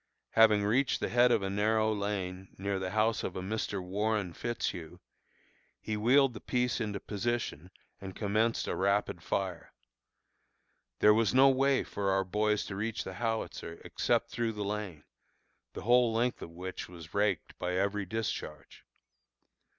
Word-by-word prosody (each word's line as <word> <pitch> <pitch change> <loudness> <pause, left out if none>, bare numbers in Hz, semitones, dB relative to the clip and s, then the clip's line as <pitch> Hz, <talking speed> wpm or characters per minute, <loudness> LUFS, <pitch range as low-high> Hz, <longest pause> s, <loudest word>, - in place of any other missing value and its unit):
Having 110 -2 +5
reached 125 +6 +2
the - - -2
head 120 +1 +5
of 110 - +2
a 95 - -1
narrow 110 +2 +2
lane, 95 -2 -3
near 100 0 -2
the 95 0 -3
house 110 +2 +1
of 90 - -4
a - - -3
Mr. 105 0 -2
Warren 100 0 -1
Fitzhugh, 90 -8 -4 0.8
he 110 - -3
wheeled 125 +5 +4
the 110 - -8
piece 125 -1 0
into 105 -2 -2
position 105 -6 -3 0.3
and 95 -1 -8
commenced 110 +2 0
a - - -1
rapid 100 +2 0
fire. 95 -3 -3 1.3
There 105 - +7
was 115 +1 +2
no 135 +1 +8
way 135 0 +3
for 100 -1 -2
our 95 0 +2
boys 105 +2 0
to 95 - -6
reach 110 +3 -2
the - - -6
howitzer 110 -7 -3
except - - 0
through 115 -1 -1
the 105 -1 -4
lane, 100 -6 -4 0.7
the - - -7
whole 120 +1 +4
length 120 +2 0
of - - -7
which 90 +2 -7
was 85 -2 -11
raked 100 -3 0
by 90 0 -1
every 100 +1 0
discharge. 90 -8 -5
105 Hz, 160 wpm, -31 LUFS, 95-115 Hz, 1.3 s, no